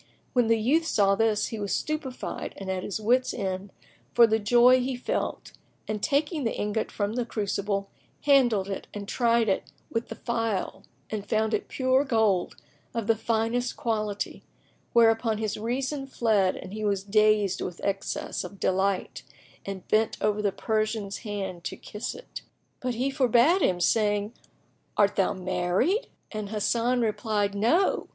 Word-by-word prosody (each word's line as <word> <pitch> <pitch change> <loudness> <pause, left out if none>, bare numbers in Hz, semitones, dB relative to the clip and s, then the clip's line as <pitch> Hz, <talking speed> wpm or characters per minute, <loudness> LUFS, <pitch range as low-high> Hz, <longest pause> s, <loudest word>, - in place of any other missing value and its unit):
[FN#15] - - -33 0.3
When 245 -3 +3
the 230 0 +4
youth 295 +9 +2
saw 195 -7 +3
this, 215 0 +2
he 225 - -5
was 200 -1 -1
stupefied 300 -4 -4
and 190 -1 -4
at 185 -1 -2
his 200 +3 -4
wits' 245 +4 +2
end 190 -2 -3 0.4
for 235 - +8
the 220 0 +2
joy 240 +4 +6
he 255 +1 -1
felt 245 - -3 0.4
and 215 -1 -3
taking 295 - 0
the 225 - -1
ingot 210 +1 -1
from 205 0 -2
the 245 +1 0
crucible 200 -3 -2 0.4
handled 245 -9 +4
it 195 - -5
and 200 -1 -6
tried 235 0 +2
it 195 - -1 0.2
with 230 0 -2
the - - -7
file 230 -5 -2 0.3
and 205 -1 -4
found 220 -1 +1
it - - -1
pure 260 +1 +2
gold 220 -8 +1 0.4
of 230 -2 -1
the 225 +1 +3
finest 230 +2 -1
quality: 215 -3 -2 0.5
whereupon 225 -1 +4
his 215 -1 -2
reason 265 +5 -2
fled 215 -7 +2
and 185 - -8
he 215 0 -4
was 200 -2 0
dazed 210 -1 +3
with 180 -1 -5
excess 195 -1 -2
of 200 - -9
delight 190 +1 0 0.5
and 195 -2 -6
bent 220 +1 +2
over 210 0 +1
the 205 -1 +1
Persian's 215 -2 -1
hand 195 -5 -5
to - - -4
kiss 210 +3 -6
it. - - -9 0.4
But 250 -1 -2
he 260 +4 0
forbade 270 - +4
him, 180 -1 +2
saying, 205 +2 +1 0.6
"Art 205 -1 +4
thou 195 +1 +2
married?" 185 - 0 0.2
and 215 -2 -4
when 215 - -5
the 235 +4 +1
youth - - 0
replied 210 -2 0
"No!" 240 - +2
220 Hz, 165 wpm, -27 LUFS, 200-240 Hz, 0.6 s, for